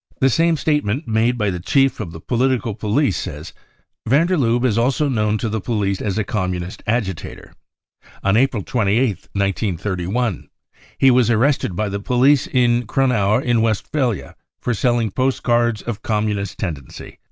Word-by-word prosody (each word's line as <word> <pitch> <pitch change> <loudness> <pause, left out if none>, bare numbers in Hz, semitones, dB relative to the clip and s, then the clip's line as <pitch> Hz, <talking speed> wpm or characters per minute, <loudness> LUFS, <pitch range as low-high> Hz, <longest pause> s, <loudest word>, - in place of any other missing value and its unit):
The 135 -1 +3
same 165 +4 +2
statement 150 -2 -1
made 115 +2 +1
by 105 -3 0
the 90 - -4
chief 135 +9 +2
of 100 -7 -5
the 80 - -9
political 125 +2 0
police 110 +2 0
says: 75 +3 -6 0.5
Van 140 +8 +4
der 185 +1 +1
Lubbe 120 -4 +1
is 115 -5 +2
also 130 +6 +1
known 105 -5 0
to 115 - -3
the 110 -1 -2
police 100 -3 -1
as 100 -1 -2
a 110 - +1
Com 95 -2 -2
munist 90 +1 -6
agitator.... 105 -6 -3 0.7
On 100 +1 +2
April 120 -3 +2
28th, 110 -2 0
1931, 100 +1 -2 0.5
he 135 - +5
was 125 -1 +3
arrested 120 -4 +1
by 105 +3 -1
the 100 0 -3
police 125 +6 +3
in 120 -2 +2
Gronau 110 -5 +2
in 120 -2 +2
Westphalia 115 +2 -1 0.2
for 125 - -1
selling 120 -1 +1
post 130 +4 -1
cards 120 -3 +1
of 115 -3 -5
Communist 105 -2 -2
tendency." 75 -9 -7
115 Hz, 165 wpm, -20 LUFS, 100-125 Hz, 0.7 s, he